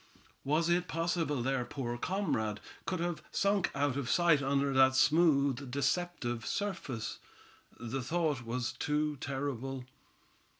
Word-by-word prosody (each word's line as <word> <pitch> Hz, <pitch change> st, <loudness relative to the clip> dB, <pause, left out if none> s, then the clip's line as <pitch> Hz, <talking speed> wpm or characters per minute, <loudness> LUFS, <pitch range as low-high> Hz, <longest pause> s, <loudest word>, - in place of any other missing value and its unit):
Was 155 Hz, +4 st, +2 dB
it 175 Hz, +1 st, +2 dB
possible 165 Hz, -5 st, 0 dB
their 135 Hz, 0 st, 0 dB
poor 120 Hz, -2 st, -4 dB
comrade 120 Hz, -, -1 dB, 0.3 s
could 185 Hz, -2 st, -1 dB
have 175 Hz, -1 st, -2 dB
sunk 200 Hz, -2 st, +2 dB
out 140 Hz, -1 st, +1 dB
of 135 Hz, -4 st, -2 dB
sight 170 Hz, -5 st, +4 dB
under 140 Hz, 0 st, +1 dB
that 130 Hz, 0 st, +5 dB
smooth 140 Hz, -4 st, +3 dB
deceptive 140 Hz, -3 st, -1 dB
surface? 135 Hz, -, -3 dB, 0.6 s
The 120 Hz, +3 st, -3 dB
thought 150 Hz, -2 st, 0 dB
was 120 Hz, +1 st, -2 dB
too 150 Hz, 0 st, -1 dB
terrible. 135 Hz, -1 st, -4 dB
140 Hz, 125 wpm, -32 LUFS, 130-165 Hz, 0.6 s, that